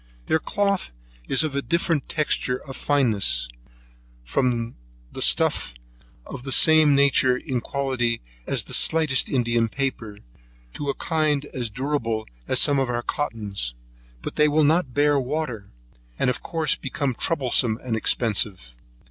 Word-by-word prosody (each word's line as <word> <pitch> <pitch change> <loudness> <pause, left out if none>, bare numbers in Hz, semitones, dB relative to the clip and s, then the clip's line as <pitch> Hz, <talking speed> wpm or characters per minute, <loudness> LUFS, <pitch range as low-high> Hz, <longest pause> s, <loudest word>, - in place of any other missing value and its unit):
Their 160 - +2
cloth 200 - -1 0.4
is 135 - +3
of 140 -3 -3
different 170 -3 0
texture 145 -4 0
of 135 - -7
fineness, 110 - +1 0.8
from 120 - -1 0.4
a - - -6
stuff - - +2 0.5
of - - -8
the 135 +1 -6
same 155 +1 +5
nature 140 -2 +4
in 130 -3 -3
quality 130 -4 -1 0.3
as - - +1
the - - -7
slightest 155 -5 +2
India 120 -3 +1
paper, 115 -4 -3 0.6
to 145 - -4
a 140 - -1
kind 155 -3 0
as 120 -3 -3
durable 115 -3 -2 0.2
as - - +1
some 140 -1 +3
of 135 -2 0
our 120 0 -2
cottons; 105 - -3 0.5
but - - -6
they 150 - +5
will 150 +1 +3
not 150 -3 +2
bear 145 0 +3
water, 125 -6 -4 0.5
and 125 - +2
of 125 - -6
course 160 -2 0
become 135 0 -3
troublesome 125 -6 +1
and 120 -3 -2
expensive. 105 - 0
135 Hz, 140 wpm, -24 LUFS, 115-150 Hz, 0.8 s, same